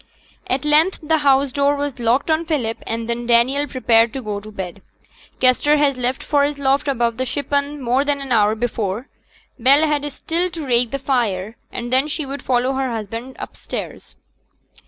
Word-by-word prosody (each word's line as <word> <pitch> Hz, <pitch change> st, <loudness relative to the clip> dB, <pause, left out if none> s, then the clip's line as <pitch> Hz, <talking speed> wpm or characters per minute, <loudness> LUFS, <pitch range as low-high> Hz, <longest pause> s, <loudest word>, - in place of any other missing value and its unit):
At 260 Hz, +2 st, -1 dB
length 310 Hz, +5 st, +3 dB
the 315 Hz, +1 st, +2 dB
house 275 Hz, -1 st, +3 dB
door 280 Hz, +2 st, +2 dB
was 285 Hz, -3 st, -4 dB
locked 245 Hz, +7 st, +1 dB
on 315 Hz, +1 st, 0 dB
Philip, 245 Hz, -9 st, -1 dB
and 230 Hz, 0 st, -3 dB
then 235 Hz, 0 st, -3 dB
Daniel 255 Hz, +5 st, +3 dB
prepared 235 Hz, -4 st, +3 dB
to 265 Hz, -, -5 dB
go 210 Hz, -2 st, -3 dB
to 215 Hz, +1 st, -11 dB
bed. 190 Hz, -4 st, -7 dB, 0.6 s
Kester 260 Hz, +4 st, +4 dB
had 285 Hz, -2 st, +2 dB
left 250 Hz, +1 st, -2 dB
for 285 Hz, -1 st, +2 dB
his 290 Hz, 0 st, -1 dB
loft 280 Hz, +1 st, +1 dB
above 235 Hz, -4 st, 0 dB
the 260 Hz, -, -1 dB
shippen 285 Hz, +2 st, -1 dB
more 255 Hz, +1 st, +1 dB
than 290 Hz, -1 st, 0 dB
an 275 Hz, -2 st, -7 dB
hour 215 Hz, -2 st, +3 dB
before. 225 Hz, 0 st, -3 dB, 0.5 s
Bell 275 Hz, +6 st, +5 dB
had 295 Hz, -1 st, -1 dB
still 335 Hz, +5 st, -2 dB
to 330 Hz, -4 st, -6 dB
rake 245 Hz, -2 st, +3 dB
the 275 Hz, -, -2 dB
fire, 230 Hz, -7 st, -1 dB, 0.2 s
and 240 Hz, +1 st, -5 dB
then 265 Hz, +3 st, +4 dB
she 305 Hz, 0 st, -3 dB
would 275 Hz, +1 st, -6 dB
follow 255 Hz, +1 st, +1 dB
her 265 Hz, -1 st, -1 dB
husband 230 Hz, +3 st, -5 dB
upstairs. -, -, -7 dB
265 Hz, 185 wpm, -20 LUFS, 235-285 Hz, 0.6 s, Bell